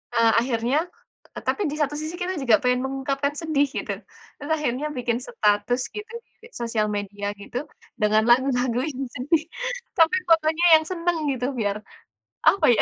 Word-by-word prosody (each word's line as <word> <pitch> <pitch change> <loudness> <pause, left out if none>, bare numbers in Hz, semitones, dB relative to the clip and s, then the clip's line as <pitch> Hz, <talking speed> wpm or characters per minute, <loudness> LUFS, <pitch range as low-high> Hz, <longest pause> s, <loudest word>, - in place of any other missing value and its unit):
eee, 230 -1 +5
akhirnya 240 +3 +1 0.6
t - - -8
tapi 415 - +1
di - - -3
satu 295 -1 +1
sisi, 310 +2 -5
kita 365 +1 -2
juga 240 -5 +5
pengen 250 0 +2
mengungkapkan 275 +1 -2
sedih, 300 -3 +2
gitu. 275 - -4 0.5
Terus 290 - -7
akhirnya 295 0 -1
bikin 235 -1 0
status 210 +4 +1
gitu, 425 +3 -7 0.3
di 460 - -13
sosial 225 -2 -1
media 205 0 -3
gitu, 245 +6 -5 0.4
dengan 215 +1 +4
lagu-lagu 245 -1 +3
yang 275 -3 -4
sedih. 300 +5 +1 0.5
Tapi, 330 +2 +5
pokoknya 320 +1 +3
yang 315 - -7
seneng, 345 -1 0
gitu, 250 -2 -2
biar, 205 -2 0 0.7
apa 395 - +5
ya, 220 - +3
265 Hz, 160 wpm, -24 LUFS, 230-310 Hz, 0.7 s, eee